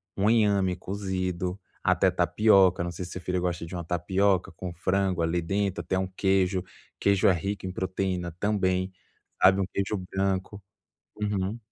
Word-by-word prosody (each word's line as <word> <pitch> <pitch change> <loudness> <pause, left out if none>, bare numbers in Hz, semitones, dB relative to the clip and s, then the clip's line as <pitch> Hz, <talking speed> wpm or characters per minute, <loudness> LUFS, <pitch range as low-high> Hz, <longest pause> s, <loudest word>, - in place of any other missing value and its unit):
um 100 +2 +2
inhame 100 -5 +3
cozido, 95 -1 -3 0.2
até - - +3
tapioca. 95 -5 +4
Não 85 - -3
sei 85 +2 -6
se 90 - -9
seu 95 - -6
filho 90 0 -1
gosta 90 -1 -2
de 85 - -7
uma 85 - -4
tapioca 95 +3 +1
com 90 +2 -6
frango 95 0 0
ali 85 +1 +1
dentro, 95 +1 -1
até 95 +2 -1
um 95 - -1
queijo. 95 -1 +1 0.4
Queijo 100 -1 +3
é 95 - +6
rico 100 +3 -3
em 95 - -3
proteína 95 -2 -2
também, 95 -3 +1 0.5
sabe? 95 +1 +7
Um 95 - +1
queijo 100 +1 -1
branco. 95 +1 -2 0.6
Uhum. 105 +1 -1
95 Hz, 165 wpm, -27 LUFS, 90-100 Hz, 0.6 s, sabe